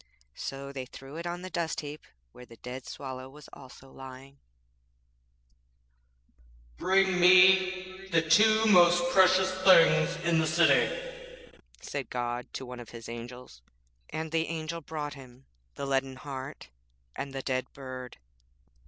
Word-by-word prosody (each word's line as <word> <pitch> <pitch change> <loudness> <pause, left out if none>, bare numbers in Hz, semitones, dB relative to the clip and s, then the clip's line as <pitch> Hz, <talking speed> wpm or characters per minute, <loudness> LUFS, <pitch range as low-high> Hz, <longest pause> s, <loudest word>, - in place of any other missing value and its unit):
So 135 - -7
they 130 -2 -7
threw 135 +3 -12
it 170 +1 -5
on 175 +1 -5
a - - -6
dust 165 -1 -2
heap 150 0 -9 0.3
where 125 - -14
the 115 - -14
dead 125 +2 -8
Swallow 130 -1 -7
was 150 +2 -14
also 135 0 -14
lying. 135 +1 -12 2.4
'Bring 190 -1 +2
me 185 +1 +4
the 165 -3 +2
two 215 +6 +5
most 175 -4 +5
precious 185 0 +4
things 185 -3 +5
in 170 -1 +3
the 160 - +1
city,' - - 0 0.3
said 140 -4 -6
God 120 0 -4
to 130 - -6
one 125 0 -9
of 120 - -10
His 115 -1 -10
Angels; 120 - -10 0.5
and 160 0 -5
the 165 0 0
Angel 165 +1 -5
brought 150 -1 -6
Him 130 -1 -15 0.3
the - - -5
leaden 135 -1 -1
heart 135 - -8 0.5
and 140 - -5
the 135 -1 -6
dead 130 -1 -2
bird. 130 -2 -9
150 Hz, 140 wpm, -28 LUFS, 130-180 Hz, 2.4 s, two